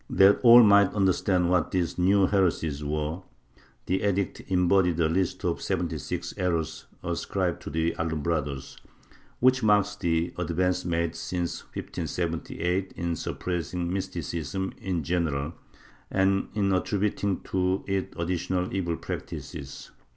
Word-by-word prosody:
That 100 +1 +5
all 120 0 +9
might 100 -2 +6
under 95 -2 +4
stand 90 -3 +1
what 90 -3 +2
these 90 -1 -1
new 95 +2 +4
heresies 85 -7 +1
were, 75 +3 -2 0.6
the 95 +2 0
edict 100 -1 0
embodied 90 -2 +3
a 80 - +4
list 90 +2 -1
of - - -1
seventy - - -2
six - - -4
errors 80 -4 -2 0.2
ascribed - - -2
to - - -7
the 80 +2 0
Alumbrados, 75 -4 -2 0.6
which 130 +1 +4
marks 105 -2 +3
the 85 -2 0
advance 90 +1 0
made 85 -1 -1
since 85 +1 -3
1578 90 +2 -3
in 85 0 -2
suppressing 85 +1 -3
mysticism 95 -1 -3
in 90 -4 -2
general 80 -2 -1 0.6
and 95 +1 +2
in 100 -2 +2
attributing 100 0 0
to 95 +1 0
it 95 -1 -2
additional 90 +1 -1
evil 85 -3 -1
practices. 70 0 -7
90 Hz, 130 wpm, -27 LUFS, 85-95 Hz, 0.6 s, all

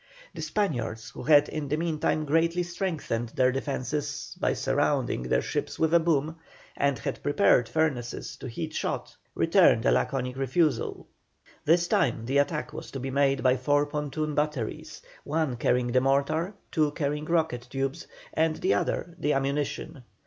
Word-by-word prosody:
The - - -7
Spaniards, 120 - -2
who - - -9
had 150 -1 +5
in 155 -2 -4
the 150 +2 0
meantime 155 -1 0
greatly 165 +4 +2
strengthened 170 - -3
their 130 0 +4
defences, 135 +1 -3
by - - +1
surrounding - - 0
their 60 - +1
ships - - -3
with 160 0 +1
a 170 - +7
boom, 160 -1 0 0.4
and 140 -2 +1
had 115 - -4
prepared 145 - +3
furnaces 140 -7 -1
to - - -7
heat 155 +6 -5
shot, - - -3 0.2
returned - - +4
a 60 - +5
laconic 125 - 0
refusal. 135 0 0 0.6
This 170 +3 +4
time 115 -7 +1
the 135 +3 +2
attack 150 +1 -1
was - - -7
to 135 - -6
be 135 +1 -4
made 135 -1 +2
by 130 0 +4
four 145 +1 +2
pontoon 150 +1 -3
batteries, 150 -6 -3 0.2
one 155 -3 -1
carrying 125 +1 +1
the 130 +1 +3
mortar, 140 +8 +1 0.2
two 155 -3 +2
carrying 150 -1 -2
rocket 160 -7 0
tubes, 135 0 -3 0.3
and 160 0 +2
the - - +1
other 165 +11 -1
the 150 - +1
ammunition. 140 +1 -2
145 Hz, 160 wpm, -27 LUFS, 130-160 Hz, 0.6 s, a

